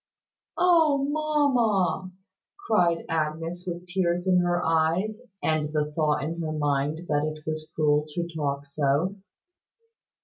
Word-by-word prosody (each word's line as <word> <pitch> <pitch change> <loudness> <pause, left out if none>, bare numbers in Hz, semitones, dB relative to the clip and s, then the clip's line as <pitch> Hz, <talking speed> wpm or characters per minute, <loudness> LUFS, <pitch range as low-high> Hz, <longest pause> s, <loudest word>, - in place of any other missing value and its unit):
"Oh! 315 -6 +4
Mamma!" 250 - +1 0.5
cried 175 -6 +1
Agnes, 165 +3 -2
with 175 0 -5
tears 180 -1 0
in 185 -1 +4
her 175 0 +1
eyes, 165 +7 +1 0.2
and 155 -1 +1
the 150 -1 -1
thought 150 -3 +1
in 165 +3 -3
her 155 -1 -3
mind 145 +2 -1
that 145 -1 +1
it 155 0 -4
was 155 0 -4
cruel 150 -1 +2
to 170 +3 -3
talk 140 -2 -2
so. 145 +6 0
165 Hz, 130 wpm, -26 LUFS, 150-185 Hz, 0.5 s, Oh